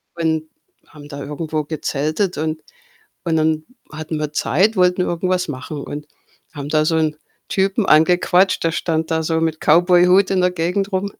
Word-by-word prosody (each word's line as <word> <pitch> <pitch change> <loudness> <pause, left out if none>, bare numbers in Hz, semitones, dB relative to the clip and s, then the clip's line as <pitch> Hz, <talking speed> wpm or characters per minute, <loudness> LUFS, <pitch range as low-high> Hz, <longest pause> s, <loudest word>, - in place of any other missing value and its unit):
und 160 -2 -1 0.4
haben 145 -1 -14
da 140 -1 -8
irgendwo 155 +1 -3
gezeltet 155 +4 -2
und 155 0 -3 0.6
und 165 -1 0
dann 155 0 +1 0.3
hatten 155 0 -5
wir 150 -1 -3
Zeit, 185 - +1
wollten 180 0 +3
irgendwas 180 0 -1
machen 140 +2 -6
und 145 +1 -7 0.5
haben 145 -1 -6
da 155 0 +2
so 160 +1 +1
'n 155 -1 0 0.3
Typen 195 +2 0
angequatscht. 180 +4 +3
Der 165 - +1
stand 160 -1 -2
da 160 0 0
so 160 0 0
mit 160 -1 -1
Cowboyhut 180 +4 +4
in 190 - +2
der 180 0 +3
Gegend 180 +4 -2
rum. 195 +2 -2
160 Hz, 165 wpm, -19 LUFS, 155-180 Hz, 0.6 s, Cowboyhut